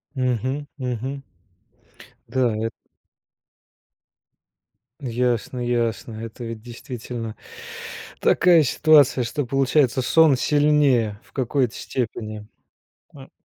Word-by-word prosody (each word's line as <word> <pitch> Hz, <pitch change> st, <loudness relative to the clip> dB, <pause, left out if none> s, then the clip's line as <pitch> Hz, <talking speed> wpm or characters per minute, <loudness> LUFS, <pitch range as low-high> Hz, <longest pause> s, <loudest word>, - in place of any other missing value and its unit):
Мгм, 130 Hz, +3 st, -1 dB
мгм. 130 Hz, +1 st, -4 dB, 1.0 s
Да, 125 Hz, -3 st, +1 dB
эт 115 Hz, -, -3 dB, 2.3 s
Ясно, 125 Hz, -2 st, -1 dB
ясно. 120 Hz, -2 st, -1 dB
Это 115 Hz, +2 st, -7 dB
ведь 115 Hz, -1 st, -6 dB
действительно 120 Hz, -1 st, -7 dB, 0.8 s
такая 170 Hz, -3 st, +5 dB
ситуация, 145 Hz, -2 st, +4 dB
что, 140 Hz, +4 st, -2 dB
получается, 135 Hz, 0 st, +2 dB
сон 155 Hz, +3 st, +5 dB
сильнее 145 Hz, -9 st, +2 dB
в -, -, -26 dB
какой-то 130 Hz, -2 st, 0 dB
степени. 110 Hz, -3 st, -4 dB, 0.7 s
М. 135 Hz, -2 st, -13 dB
125 Hz, 85 wpm, -23 LUFS, 115-140 Hz, 2.3 s, такая